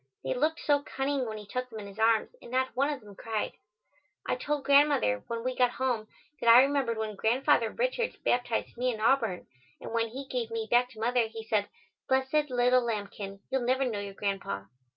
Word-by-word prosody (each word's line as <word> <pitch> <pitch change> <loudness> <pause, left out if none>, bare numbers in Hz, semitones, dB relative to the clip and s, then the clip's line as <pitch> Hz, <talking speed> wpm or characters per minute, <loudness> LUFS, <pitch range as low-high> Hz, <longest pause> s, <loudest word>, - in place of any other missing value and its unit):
They 130 - -1
looked 310 +5 0
so 290 -1 +3
cunning 270 -2 -2
when 215 -1 -5
he 210 - -9
took 250 +5 -4
them 225 - -9
in 205 - -7
his 200 +2 -11
arms 225 0 +3
and - - -12
not 260 +1 0
one 275 +3 +2
of 280 -3 -5
them 205 -1 -13
cried. 220 +1 -3 0.7
I - - 0
told 290 +2 -2
Grandmother 280 - +4
when 230 0 -4
we 255 0 -2
got 250 -1 +4
home 245 -4 -1 0.3
that 235 - +2
I 240 +3 +10
remembered 270 -5 0
when 215 -1 -3
Grandfather 235 +2 +2
Richards - - -1
baptized 245 -2 0
me 250 +1 +1
in 220 - -6
Auburn, 225 -5 +2 0.3
and - - -8
when 230 0 +1
he 270 +4 -7
gave 250 -4 -3
me 225 -1 -3
back 245 +1 +4
to 230 -4 -14
mother 240 0 +2
he 225 0 -8
said, 215 -2 0 0.4
"Blessed 265 +3 +2
little 250 0 +3
lambkin, 200 -3 -4
you'll 265 -1 +1
never 260 +2 +1
know 225 -5 -2
your 200 -1 -6
grandpa." 195 - -3
240 Hz, 210 wpm, -29 LUFS, 220-265 Hz, 0.7 s, I